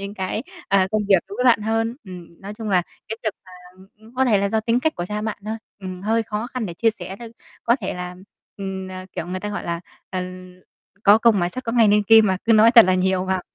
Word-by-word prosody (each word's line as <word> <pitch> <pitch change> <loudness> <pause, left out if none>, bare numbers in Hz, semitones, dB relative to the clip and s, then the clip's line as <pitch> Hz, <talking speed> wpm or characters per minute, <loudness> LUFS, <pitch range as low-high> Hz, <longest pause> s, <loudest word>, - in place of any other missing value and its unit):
những 200 +1 -6
cái, 190 +4 -3 0.3
à, 195 -1 +3
công 215 -1 +1
việc 190 -4 +5
đối 200 - -8
với 250 - -1
bạn 240 -4 +5
hơn. 225 +2 -1
Ừm. 180 -2 -9 0.2
Nói 200 +2 -8
chung 220 0 -6
là 180 -2 +3 0.3
cái 220 - -4
việc 215 - +1
mà, 185 - -16 0.3
ừm, 190 - -17
ưm, 220 +3 -19
có 265 - +2
thể 225 -5 +3
là 200 0 0
do 220 +1 0
tính 230 +2 +1
cách 315 +3 0
của 175 - -4
cha 210 +1 -4
bạn 220 -1 -3
thôi, 220 +1 -3 0.2
ừm, 185 -1 -7
hơi 225 +2 +1
khó 215 +1 -4
khăn 255 -3 -4
để 170 - -7
chia 225 +5 +2
sẻ 190 -2 -8
thôi. 235 -1 -8 0.4
Có 235 +2 +3
thể 190 - -3
là, 180 0 -6 0.4
ừm, 190 -1 -5
ờ, 185 0 -8
kiểu, 170 -2 -5
người 185 +1 -4
ta 210 - -4
gọi 205 - -5
là, 170 -1 -3 0.3
ờ, 185 -1 -2 0.8
có 205 +2 +7
công 225 -2 +4
mài 175 -1 +1
sắt 255 +7 -7
có 230 - -2
ngày 230 -3 +5
nên 210 +1 +4
kim 220 +1 +6
mà, 190 - +1
cứ 230 - +4
nói 220 +1 +7
thật 235 -4 +9
là 185 - +2
nhiều 185 0 +1
vào 190 -1 -1
210 Hz, 275 wpm, -22 LUFS, 185-225 Hz, 0.8 s, thật